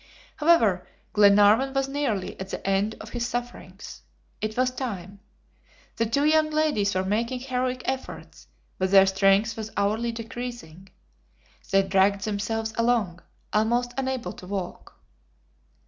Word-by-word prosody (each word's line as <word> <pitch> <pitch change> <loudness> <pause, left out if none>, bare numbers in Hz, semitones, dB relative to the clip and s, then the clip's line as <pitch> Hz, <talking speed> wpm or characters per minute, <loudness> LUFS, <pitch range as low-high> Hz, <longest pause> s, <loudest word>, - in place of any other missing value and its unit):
However, 230 - +3 0.3
Glenarvan 210 +6 +5
was 270 0 +1
nearly 270 -9 -2
at 190 0 -6
the - - -6
end 195 +3 +1
of - - -10
his 240 -1 -2
sufferings. 245 0 -7 0.4
It 215 +1 -3
was 255 0 +2
time. 200 -7 -6 0.8
The 230 0 +1
two 280 +6 +1
young 310 0 +4
ladies 295 -11 +1
were 185 - +1
making 230 +5 -1
heroic 255 0 -2
efforts, 265 0 -6 0.3
but 190 0 +1
their 195 0 +7
strength 195 +3 +2
was 220 -1 -6
hourly 215 +4 0
decreasing. 230 -6 -8 0.8
They 195 0 +4
dragged 195 +1 +2
themselves 220 +1 -2
along, 225 -7 +1 0.3
almost 240 +3 +1
unable 260 -2 -3
to 180 - -12
walk. 195 -2 -6
220 Hz, 130 wpm, -25 LUFS, 195-250 Hz, 0.8 s, their